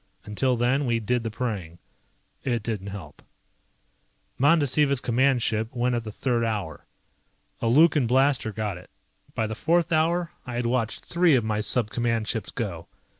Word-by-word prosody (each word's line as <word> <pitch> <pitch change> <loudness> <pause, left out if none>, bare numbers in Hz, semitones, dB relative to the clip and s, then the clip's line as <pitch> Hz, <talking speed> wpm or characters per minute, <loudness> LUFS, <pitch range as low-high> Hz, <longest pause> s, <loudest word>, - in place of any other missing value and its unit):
Until 125 +4 0
then 130 +4 +1
we 115 -1 +1
did 120 +3 0
the 115 - -3
praying. 105 -7 -4 0.7
It 120 -4 -1
didn't 105 -4 -4
help. 95 -7 -9 1.2
Mandasiva's 145 -1 +3
command 125 +1 +2
ship 110 +2 -1
went 125 +1 +1
at 120 -1 -1
the 110 - -6
third 120 +1 -1
hour. 105 -8 -3 0.7
A 115 - 0
Lukan 145 +1 +4
blaster 130 -2 +2
got 105 -4 -3
it. 90 - -17 0.5
By 110 - 0
the 110 - -4
fourth 170 +8 +1
hour 170 +2 +1
I 125 - -6
had 120 0 -1
watched 115 -2 -1
three 175 -3 +3
of 120 - +2
my 110 -1 0
sub 110 +1 0
command 115 -2 -1
ships - - -2
go. - - -5
120 Hz, 165 wpm, -25 LUFS, 110-135 Hz, 1.2 s, Lukan